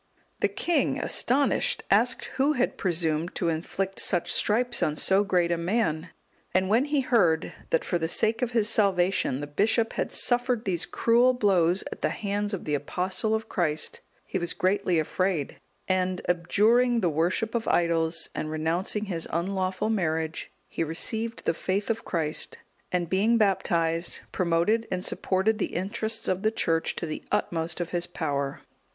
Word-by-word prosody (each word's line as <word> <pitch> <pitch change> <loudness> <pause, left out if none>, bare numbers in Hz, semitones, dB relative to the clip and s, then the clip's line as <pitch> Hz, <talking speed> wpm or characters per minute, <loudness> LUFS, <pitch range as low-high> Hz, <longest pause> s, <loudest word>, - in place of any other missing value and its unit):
The - - +3
king, 345 -1 0
astonished, 285 - +1
asked - - +3
who 280 +3 +3
had 255 -3 0
presumed 165 -2 -1
to 170 - 0
inflict 190 +4 -3
such 175 -3 +1
stripes 240 +3 +1
on 150 - +1
so 190 +5 +3
great 180 -4 +1
a 170 - 0
man. 170 -3 -1 0.5
And 185 0 +2
when 230 +6 +3
he 290 -1 +1
heard 180 -11 +2 0.2
that 165 - +1
for 175 - 0
the 160 - -1
sake 220 +7 +1
of 250 - +1
his 230 -3 +1
salvation 190 - +2
the - - -3
bishop 220 +9 +1
had - - -2
suffered 245 -1 +1
these 175 -4 -1
cruel 240 +2 +3
blows 190 -5 +3
at - - -8
the - - +1
hands 205 0 -2
of 185 - -9
the 150 - -2
Apostle 185 +9 -1
of 220 0 -4
Christ, 155 -7 -1 0.2
he 190 - -3
was 175 -1 -1
greatly 185 -2 +1
afraid; 160 -1 -1 0.3
and 185 -1 0
abjuring 225 +8 +3
the 180 - +2
worship 175 +8 0
of 235 -1 -2
idols, 165 -1 +1
and 155 - -3
renouncing 165 +7 -1
his 170 -5 -2
unlawful 185 +4 -1
marriage, 160 -5 -2 0.2
he - - -2
received 220 +8 -2
the - - +2
faith 195 +6 -1
of 225 0 -3
Christ, 155 -3 -1 0.3
and 180 -1 0
being 210 +7 +2
baptized, 170 -5 0
promoted 185 +6 +1
and 180 0 -3
supported 195 +4 0
the - - -2
interests 220 +4 -2
of 185 0 0
the 215 - +3
Church 165 -7 0
to - - -4
the 155 -1 -5
utmost 165 0 -1
of 175 -1 -3
his 175 -1 -2
power. 140 -5 -3
185 Hz, 165 wpm, -27 LUFS, 165-220 Hz, 0.5 s, The